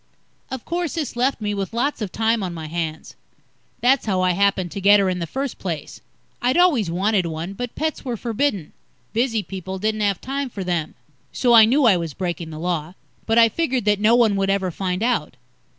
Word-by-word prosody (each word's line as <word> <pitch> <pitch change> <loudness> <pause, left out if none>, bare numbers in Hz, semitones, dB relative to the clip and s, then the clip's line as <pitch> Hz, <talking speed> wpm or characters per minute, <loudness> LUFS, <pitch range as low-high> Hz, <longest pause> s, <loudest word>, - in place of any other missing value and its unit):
Of 260 -2 -6
course, 345 -2 -2
this 300 -8 -3
left 255 +2 +1
me 210 -1 -2
with 200 +2 -4
lots 260 +1 -1
of 205 -4 -3
time 225 0 +1
on 180 -3 -4
my 160 -1 -6
hands. 160 -1 -5 0.7
That's 255 0 +3
how 190 -3 +1
I 185 0 +3
happened 190 -1 +1
to 200 - -5
get 205 +1 +6
her 190 -2 +2
in 180 - -3
the 170 - -3
first 270 - -4
place. 165 -6 -5 0.4
I'd 250 +4 +2
always 300 - +4
wanted 190 +1 +1
one, 165 +4 -5
but 245 +4 -6
pets 315 0 -2
were 245 -3 -3
forbidden. 225 - -2 0.4
Busy 230 -2 0
people 190 -1 -6
didn't 215 +2 -1
have 200 -3 +1
time 275 +1 -3
for 200 -5 -6
them. 175 -4 -2 0.4
So 245 -2 +2
I 225 -2 +9
knew 265 +5 +3
I 205 -6 +6
was 165 -4 -5
breaking 170 -3 -4
the 155 - -8
Law. 170 0 -3 0.3
But 225 +1 +2
I 230 -1 +8
figured 255 -2 -1
that 205 -1 +2
no 215 +3 +4
one 230 -4 +4
would 195 0 0
ever 195 -2 0
find 185 +3 -2
out. 225 - 0
205 Hz, 215 wpm, -22 LUFS, 180-240 Hz, 0.7 s, I